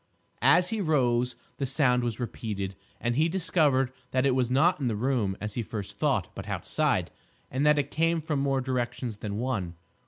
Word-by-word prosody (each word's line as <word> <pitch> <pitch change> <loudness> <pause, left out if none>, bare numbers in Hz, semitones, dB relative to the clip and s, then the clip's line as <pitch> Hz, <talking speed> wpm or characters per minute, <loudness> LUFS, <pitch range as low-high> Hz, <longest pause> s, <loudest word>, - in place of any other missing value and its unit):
As 180 +1 +5
he 225 -2 -1
rose 125 -7 +2 0.2
the 135 - -1
sound 125 -3 +2
was 120 -1 -2
repeated, 105 -5 -4 0.3
and 120 0 -1
he 155 +4 +3
discovered 155 -8 +2 0.2
that 130 +1 +1
it 135 - +4
was 125 -2 +1
not 150 +7 +3
in 135 - -1
the 115 - 0
room 110 -4 0
as 105 0 -4
he 120 - -2
first 105 -2 -6
thought, - - +1
but - - -8
outside, - - 0 0.4
and 135 +4 +1
that 150 0 +5
it 145 -1 -1
came 165 +1 +2
from 155 -2 -2
more 135 -1 +1
directions 125 -3 -2
than 105 -1 -4
one. 105 -8 -2
130 Hz, 190 wpm, -28 LUFS, 120-150 Hz, 0.4 s, As